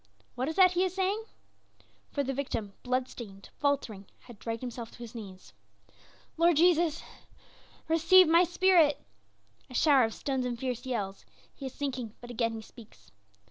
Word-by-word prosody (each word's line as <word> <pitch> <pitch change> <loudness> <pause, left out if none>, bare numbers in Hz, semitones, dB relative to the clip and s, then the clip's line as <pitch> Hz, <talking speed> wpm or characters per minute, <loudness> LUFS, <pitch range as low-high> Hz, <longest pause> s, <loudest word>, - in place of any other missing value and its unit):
What 255 +2 -2
is 315 - -3
that 370 -2 +6
he 365 0 +1
is 375 -1 -2
saying?" 390 +3 -1 0.8
For 285 - -1
the 270 0 -2
victim, 230 -7 -4
blood 255 0 -1
stained, 195 -6 -11
faltering, 245 -9 -1
had 240 -5 -14
dragged 230 0 -4
himself 240 -2 -6
to - - -16
his 235 -2 -9
knees. 195 - -10 0.8
"Lord 335 -1 +4
Jesus, 335 -1 +3 0.8
receive 335 +3 +6
my 335 +2 +6
spirit." 350 -4 +4 0.7
A 255 - -10
shower 280 -2 +5
of 225 - -5
stones 265 -2 -2
and 240 -1 -3
fierce 250 0 -4
yells; 205 -6 -3 0.3
he 275 - -7
is 260 - -8
sinking, 255 -6 -4
but 240 0 -10
again 230 -1 -1
he 220 -1 -7
speaks. 225 0 -17
260 Hz, 165 wpm, -29 LUFS, 230-330 Hz, 0.8 s, that